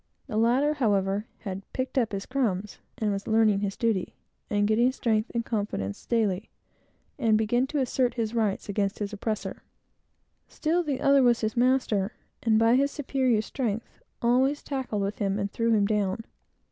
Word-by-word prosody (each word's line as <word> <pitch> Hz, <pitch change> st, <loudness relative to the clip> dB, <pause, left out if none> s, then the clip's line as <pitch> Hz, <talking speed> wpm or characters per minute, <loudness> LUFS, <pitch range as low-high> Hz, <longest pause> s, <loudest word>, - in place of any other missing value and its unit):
The -, -, -6 dB
latter, 250 Hz, +7 st, +3 dB
however, 205 Hz, -5 st, +1 dB
had 195 Hz, -2 st, -5 dB
"picked 260 Hz, 0 st, -3 dB
up 240 Hz, -5 st, +1 dB
his 195 Hz, -1 st, -4 dB
crumbs," 210 Hz, -7 st, -2 dB, 0.2 s
was 205 Hz, -2 st, -1 dB
learning 220 Hz, -2 st, +4 dB
his 200 Hz, -1 st, -3 dB
duty, 220 Hz, -6 st, 0 dB, 0.3 s
and 205 Hz, 0 st, +2 dB
getting 235 Hz, +4 st, +3 dB
strength 225 Hz, -4 st, 0 dB
and 230 Hz, 0 st, 0 dB
confidence 205 Hz, -, -3 dB
daily; 215 Hz, -4 st, 0 dB, 0.7 s
and 225 Hz, -4 st, +3 dB
began 240 Hz, +4 st, +1 dB
to 300 Hz, -, -3 dB
assert 255 Hz, -2 st, +1 dB
his 230 Hz, -2 st, -2 dB
rights 215 Hz, -4 st, 0 dB
against 200 Hz, 0 st, -1 dB
his 205 Hz, 0 st, -4 dB
oppressor. 215 Hz, +1 st, -3 dB, 0.9 s
Still, 335 Hz, +3 st, 0 dB
the 290 Hz, -6 st, -2 dB
other 275 Hz, 0 st, +5 dB
was 240 Hz, -2 st, +4 dB
his 215 Hz, -1 st, -1 dB
master, 240 Hz, -5 st, +2 dB, 0.3 s
and, 225 Hz, -2 st, +3 dB
by 230 Hz, +2 st, +5 dB
his 280 Hz, +1 st, +3 dB
superior 260 Hz, -6 st, 0 dB
strength, 230 Hz, -3 st, -4 dB, 0.2 s
always 260 Hz, +5 st, +2 dB
tackled 260 Hz, -7 st, -2 dB
with 200 Hz, +1 st, -3 dB
him 200 Hz, -1 st, 0 dB
and 200 Hz, -1 st, -2 dB
threw 230 Hz, +2 st, 0 dB
him 210 Hz, -2 st, +4 dB
down. 210 Hz, 0 st, 0 dB
225 Hz, 165 wpm, -27 LUFS, 205-250 Hz, 0.9 s, other